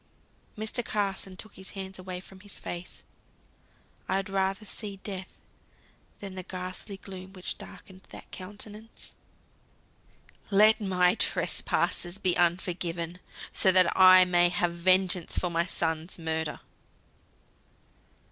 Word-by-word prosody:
Mr. 220 +3 -2
Carson 195 -3 -2
took 215 - -7
his 190 0 -7
hands 190 0 -6
away 185 -1 -5
from 190 +1 -14
his 205 0 -8
face. 175 +1 -7 1.1
I 190 - +2
would 195 0 -3
rather 195 +2 0
see 205 -1 -4
death 190 -2 -4 0.9
than 195 -2 -6
the 185 - -5
ghastly 185 +2 -5
gloom 190 -1 -10
which 185 -2 -5
darkened 190 -1 -11
that - - -12
countenance. 210 +3 -7 1.4
"Let 215 +2 +6
my 180 -2 +3
trespasses 175 -4 +1
be 185 -3 +1
unforgiven, 175 -1 0 0.3
so 190 - +4
that 185 -2 +5
I 185 -1 +9
may 175 -1 +4
have 175 -1 +1
vengeance 185 0 +2
for 180 - 0
my 170 +1 +1
son's 160 0 -2
murder." 160 -2 -3
185 Hz, 120 wpm, -28 LUFS, 175-195 Hz, 1.4 s, I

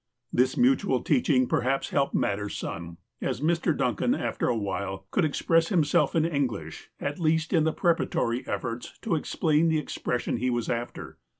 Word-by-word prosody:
This 125 +1 +2
mutual 245 - +3
teaching 130 -2 +3
perhaps 130 +3 0
helped 140 -1 +1
matters 105 +1 -1
some, 85 0 -6 0.2
as - - -2
Mr. 165 0 +1
Duncan, 120 -5 +1
after - - -2
a 120 - +1
while, 95 -2 -3
could 190 - +2
express 165 +2 +2
himself 165 -6 +2
in 160 -1 +3
Eng 145 -5 +1
lish, 80 -9 -8
at 145 +3 -3
least 160 0 +1
in 160 -3 +4
preparatory 155 -9 0
efforts 120 0 -4
to 225 - -1
explain 160 0 +1
the 160 - +2
expres 125 -4 -2
sion - - -1
he 125 +2 0
was 120 -2 -1
after. 120 - -5
135 Hz, 170 wpm, -27 LUFS, 115-160 Hz, 0.2 s, in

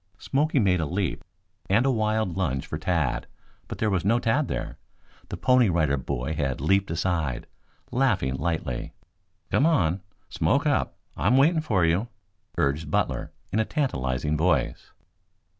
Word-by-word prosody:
Smoky 145 +7 0
made 95 -7 +3
a 80 - -1
leap 90 +3 -2 0.5
and 110 +6 +3
a 135 - +3
wild 110 -5 0
lunge 75 -9 -1
for 75 - -5
Tad, 80 -5 0 0.4
but - - -6
there 110 -1 0
was 90 -3 0
no 110 +5 +3
Tad 120 +5 +1
there. - - -4 0.5
The - - -5
Pony 125 -4 +4
Rider 80 -5 +2
Boy 70 +1 -3
had 70 -4 -1
leaped 95 +7 +2
aside, 80 -7 -1 0.5
laughing 110 - +1
lightly. 80 -3 -3 0.6
"Come 145 - +4
on. 95 - +2 0.3
Smoke - - +1
up! - - 0 0.2
I'm 115 +8 +3
waiting 160 +4 +4
for 95 - +2
you!" 85 +8 +1 0.5
urged 75 +3 0
Butler - - -1 0.2
in 110 - +2
a - - +4
tantalizing 75 - -1
voice. 85 +4 0
90 Hz, 150 wpm, -26 LUFS, 75-115 Hz, 0.6 s, Pony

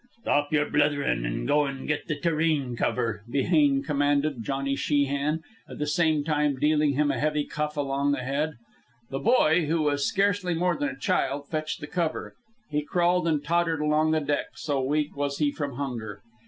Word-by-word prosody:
"Stop 145 +1 +1
yer 150 -1 +2
blitherin', 145 - +1
an' - - -3
go 150 - +3
an' 135 -1 -6
get 150 -1 -2
the 155 - -1
tureen 155 -5 0
cover," 115 -3 -1
Behane 140 0 +2
commanded 145 -2 +1
Johnny 135 +2 -1
Sheehan, 145 +2 0 0.3
at - - -8
the 150 - -1
same 155 0 +2
time 150 -2 +1
dealing 150 +1 +2
him 145 +1 +2
a - - -2
heavy 150 0 +1
cuff 150 0 -3
alongside 140 0 0
the 125 - -5
head. 150 +4 -1 0.6
The 135 - -2
boy, 170 - +3
who 160 0 +1
was 145 -1 +1
scarcely 195 -2 +1
more 180 +2 +1
than 290 -1 -1
a 270 - -8
child, 145 - -1
fetched 155 -1 -3
the - - -4
cover. 165 -1 -2 0.3
He 150 0 -1
crawled 175 +3 +1
and 150 -3 +1
tottered 165 0 +1
along 150 +1 +2
the 155 0 +2
deck, 145 0 -1
so 140 -3 -1
weak 150 +3 -1
was 140 0 -2
he 150 -2 +1
from 145 -2 -4
hunger. 120 -7 -5
150 Hz, 185 wpm, -26 LUFS, 140-155 Hz, 0.6 s, go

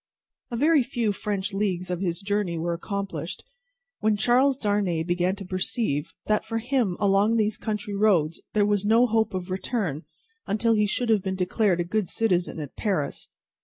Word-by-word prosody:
A 240 - -3
very 300 +3 +4
few 235 -3 -1
French 200 0 -3
leagues 185 -3 -1
of 180 - -2
his 175 -1 -2
journey 200 -4 -1
were 170 +1 -1
accomplished, 200 +3 -4 0.6
when 215 -1 +2
Charles 255 +5 +3
Darnay 205 - 0
began 175 +2 0
to 200 -1 -8
perceive 185 - -1
that 215 0 +1
for 225 - -3
him 235 -5 0
along 205 +3 +3
these 215 -1 +1
country 210 -2 -3
roads 190 -6 +2
there 210 -1 +3
was 205 -1 +1
no 225 +4 +5
hope 220 -4 +1
of 185 0 -4
return 185 - -2 0.4
until 225 +2 +2
he 210 -1 +3
should 240 +3 -1
have 215 -3 +4
been 190 0 -2
declared 185 0 +1
a - - +2
good 195 +2 -1
citizen 180 -6 0
at 145 -3 -7
Paris. 185 -10 -2
205 Hz, 175 wpm, -25 LUFS, 180-220 Hz, 0.6 s, no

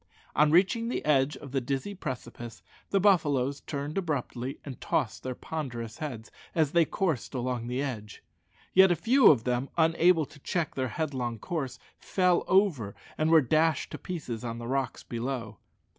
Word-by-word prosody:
On 150 +1 +5
reaching 195 +8 +3
the - - -3
edge 145 -1 +3
of 140 -3 -10
the 135 -1 0
dizzy 135 +10 -3
precipice, 120 - -7 0.3
the 195 - +2
buffaloes 145 -9 +3
turned 145 +4 -3
abruptly 135 -6 -3
and 135 -4 -8
tossed - - -1
their 130 -1 -4
ponderous 120 -9 -5
heads 125 -8 -6 0.2
as 155 -4 +2
they 170 -1 +4
coursed 160 - -2
along 125 -1 -2
the 125 +3 -1
edge. 110 -7 -6 0.5
Yet 190 0 +7
a 175 - +3
few 230 - +5
of 125 -7 +4
them, 125 +2 -1
unable 165 0 +4
to 145 - -16
check 165 +2 -2
their 130 -1 -1
headlong 125 -4 -3
course, 135 +1 -4 0.2
fell 180 -2 +2
over, 175 - +2 0.2
and 155 +1 +1
were 160 -1 +7
dashed 155 +2 +1
to - - -6
pieces 135 -10 -5
on 115 -1 -4
the 120 - -6
rocks 135 +1 -2
below. 120 +1 -4
140 Hz, 170 wpm, -29 LUFS, 125-165 Hz, 0.5 s, Yet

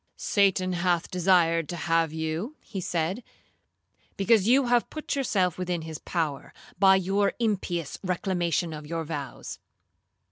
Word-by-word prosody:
'Satan 190 -2 +2
hath 175 -1 0
desired 170 -3 +3
to 175 - -3
have 165 -2 +1
you,' 160 - -3
he 195 -4 -7
said, 175 +6 -2 0.9
'because 205 0 +3
you 260 +3 +5
have 240 -1 +2
put 310 -2 -4
yourself 190 - 0
within 180 -2 -2
his 160 -1 -7
power, 155 -5 -3 0.3
by 190 0 +7
your 195 +2 +1
impious 185 -8 -2
reclamation 175 -3 -1
of 150 -1 -8
your 165 +1 -3
vows. 145 -4 -6
180 Hz, 135 wpm, -27 LUFS, 165-195 Hz, 0.9 s, by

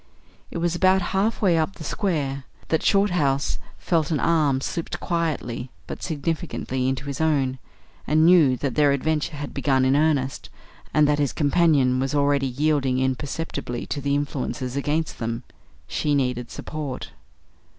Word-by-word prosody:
It - - -6
was 170 0 0
about 185 +1 +4
half 210 +4 +1
way 175 -4 +4
up 160 +5 -1
the 160 - -9
square 145 -8 -2 0.2
that 160 - +2
Shorthouse 175 -9 +2 0.2
felt 165 -4 0
an 155 -4 0
arm 150 -5 +2
slipped 165 +4 -4
quietly 155 -8 -2 0.2
but - - -7
significantly 145 -5 -2
into 135 +1 -3
his 140 +1 -4
own, 135 -5 +1 0.5
and 155 +2 +4
knew 170 -4 +7
then 130 - +1
that 140 -4 -1
their 145 -2 +4
adventure 150 +2 -1
had 145 0 -6
begun 135 -2 +2
in 130 +1 +3
earnest, 145 -3 +1 0.4
and 150 -1 +4
that 150 0 +2
his 145 -2 +1
companion 145 -5 +3
was 135 +2 -1
already 140 -1 +2
yielding 135 -1 +1
imperceptibly 130 -1 -2
to 145 - -4
the 140 +1 +1
influences 140 -2 -3
against 150 +3 -1
them. 115 +1 -3 0.4
She 145 - 0
needed 125 -3 -1
support. 145 -4 -6
145 Hz, 155 wpm, -24 LUFS, 130-160 Hz, 0.5 s, knew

